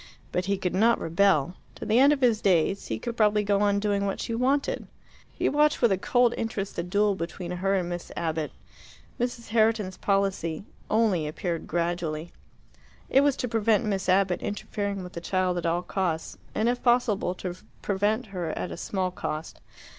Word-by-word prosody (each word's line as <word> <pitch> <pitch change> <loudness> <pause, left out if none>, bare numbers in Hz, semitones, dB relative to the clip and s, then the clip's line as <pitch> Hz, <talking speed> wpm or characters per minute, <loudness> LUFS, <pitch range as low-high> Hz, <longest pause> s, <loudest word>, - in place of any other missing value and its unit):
But 180 - -1
he 200 +1 0
could 180 -2 -2
not 225 +5 +4
rebel. 170 -2 +2 0.2
To - - -7
the 220 +3 +3
end 280 +2 +7
of 290 -2 +1
his 235 -4 +3
days 195 0 +2
he 110 - -2
could 235 - -5
probably 210 -2 +3
go 200 0 +2
on 200 -1 +3
doing 200 -1 0
what 195 - -3
she 230 - -3
wanted. 265 +4 0 0.4
He - - -1
watched 300 +1 +3
with 235 -4 +4
a 190 - +3
cold 245 +3 +3
interest 205 -3 -3
the - - -1
duel 200 +4 +2
between 175 0 -5
her 190 +2 0
and 180 -2 0
Miss 175 -1 -5
Abbott. 160 -2 -2 0.7
Mrs. 240 -2 -3
Herriton's 220 -4 +2
policy 195 -5 0 0.3
only 210 -8 +2
appeared 165 +2 -3
gradually. 170 -1 -2 0.8
It 270 - +6
was 285 -1 +3
to 250 - -2
prevent 225 -2 +2
Miss 195 -3 -1
Abbott 185 -1 +3
interfering 200 -1 -3
with 180 - -9
the 170 - -6
child 185 0 0
at 170 - -2
all 170 +2 0
costs, 170 -5 -2 0.2
and 220 - +1
if 245 +1 0
possible 240 -7 +2
to 180 -1 -5 0.3
prevent 205 +4 0
her 175 -3 -2
at - - -3
a - - -6
small 185 -2 -2
cost. 155 -3 -5
195 Hz, 185 wpm, -27 LUFS, 175-220 Hz, 0.8 s, end